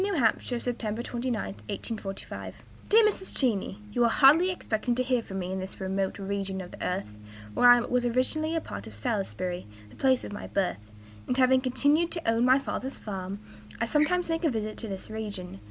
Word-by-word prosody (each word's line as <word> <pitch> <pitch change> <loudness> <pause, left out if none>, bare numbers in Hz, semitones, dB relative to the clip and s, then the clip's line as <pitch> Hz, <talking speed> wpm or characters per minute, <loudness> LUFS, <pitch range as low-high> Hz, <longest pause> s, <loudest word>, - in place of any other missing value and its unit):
H., 295 - +1
September 235 -2 -2
29, 240 - -3 0.4
'45. 195 -1 -6 0.3
"DEAR 445 +1 +7
MRS. 395 -2 0
CHENEY, 215 -7 +1
You 240 +2 +2
are - - +4
hardly 300 +9 +6
expecting 240 -9 -1
to 255 - +1
hear 255 -2 +1
from 195 -3 -7
me 185 -1 -3
in 190 - -2
this 190 0 -6
remote 190 0 -1
region 195 -1 -3
of 180 -1 -7
the - - -8
earth. 180 - -3 0.4
Where 245 - +6
I 245 - +9
am 240 - -1
was 250 0 +2
originally 260 +7 +1
a 325 - 0
part 100 - -7
of 105 - -9
Salisbury, 180 - -2 0.2
the - - -15
place 260 -1 +2
of - - -6
my 205 - -6
birth; 140 - -2 0.4
and, 250 - 0
having 260 0 +5
continued 285 +6 +2
to 335 -6 -3
own 225 +1 +3
my 255 +1 +6
father's 270 -1 -4
farm, 195 -1 -5 0.4
I 230 - +1
sometimes 310 +7 +2
make 330 +1 -1
a 320 - +4
visit 215 -3 -3
to 225 - -4
this 195 +1 -6
region. 205 - -5
230 Hz, 200 wpm, -28 LUFS, 195-265 Hz, 0.4 s, I